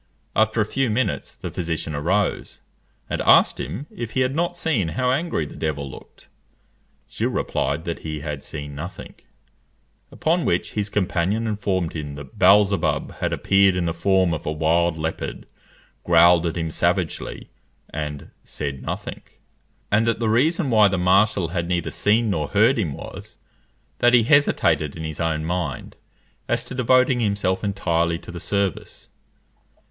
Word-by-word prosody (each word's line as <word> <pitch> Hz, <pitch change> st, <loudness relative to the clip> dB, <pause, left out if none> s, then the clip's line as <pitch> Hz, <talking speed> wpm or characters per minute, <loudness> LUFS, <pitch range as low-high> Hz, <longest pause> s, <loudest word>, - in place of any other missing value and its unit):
After 110 Hz, +1 st, +2 dB
a -, -, +2 dB
few 135 Hz, +4 st, -1 dB
minutes 110 Hz, 0 st, -1 dB
the -, -, -7 dB
physician 80 Hz, -2 st, -3 dB
arose, 90 Hz, +8 st, -1 dB, 0.5 s
and -, -, -2 dB
asked -, -, +5 dB
him 135 Hz, +8 st, -5 dB
if 115 Hz, -2 st, -6 dB
he 130 Hz, -, +1 dB
had 130 Hz, +1 st, +1 dB
not 175 Hz, +3 st, -1 dB
seen 140 Hz, -, 0 dB
how 125 Hz, +11 st, 0 dB
angry 140 Hz, -, -1 dB
the -, -, -11 dB
devil 75 Hz, -3 st, -3 dB
looked? -, -, -14 dB, 0.8 s
Gilles -, -, -2 dB
replied 70 Hz, +4 st, -2 dB
that 85 Hz, -, -3 dB
he 75 Hz, -2 st, -5 dB
had 75 Hz, -2 st, -5 dB
seen 75 Hz, -1 st, -7 dB
nothing; 85 Hz, +6 st, -8 dB, 1.0 s
upon 165 Hz, +2 st, 0 dB
which 85 Hz, -, 0 dB
his 105 Hz, -1 st, -2 dB
companion 100 Hz, +2 st, 0 dB
informed 100 Hz, -5 st, -1 dB
him 75 Hz, -3 st, -5 dB
that 70 Hz, -2 st, -11 dB
Beelzebub 100 Hz, +1 st, +3 dB
had -, -, -1 dB
appeared 95 Hz, -1 st, +3 dB
in 90 Hz, -1 st, 0 dB
the 85 Hz, -, -1 dB
form 95 Hz, +1 st, +2 dB
of 80 Hz, -, -4 dB
a -, -, 0 dB
wild 80 Hz, +2 st, +1 dB
leopard, 80 Hz, +1 st, -4 dB, 0.6 s
growled 85 Hz, 0 st, +5 dB
at 85 Hz, -, -3 dB
him 80 Hz, -1 st, -2 dB
savagely, 85 Hz, 0 st, -2 dB, 0.4 s
and 75 Hz, -1 st, -5 dB
said 70 Hz, -3 st, -5 dB
nothing; -, -, -5 dB, 0.7 s
and 110 Hz, +3 st, +3 dB
that 115 Hz, -, +1 dB
the 115 Hz, -2 st, 0 dB
reason 145 Hz, -, +2 dB
why 110 Hz, -2 st, +6 dB
the 95 Hz, -1 st, -1 dB
marshal 95 Hz, 0 st, +3 dB
had 85 Hz, -1 st, -2 dB
neither 90 Hz, -1 st, -1 dB
seen 110 Hz, +1 st, +2 dB
nor 75 Hz, -6 st, -1 dB
heard 110 Hz, -, +3 dB
him 85 Hz, -9 st, -1 dB
was, -, -, -10 dB, 0.6 s
that 120 Hz, +1 st, +5 dB
he 120 Hz, -, +5 dB
hesitated 125 Hz, -, +2 dB
in 80 Hz, -, -6 dB
his 80 Hz, -1 st, -6 dB
own 80 Hz, -2 st, -1 dB
mind 85 Hz, -5 st, -3 dB, 0.5 s
as -, -, 0 dB
to -, -, -8 dB
devoting 125 Hz, 0 st, +3 dB
himself 100 Hz, -4 st, 0 dB
entirely 85 Hz, -4 st, 0 dB
to 85 Hz, -, -11 dB
the 85 Hz, -, -7 dB
service. 100 Hz, -1 st, -3 dB
95 Hz, 160 wpm, -22 LUFS, 80-110 Hz, 1.0 s, why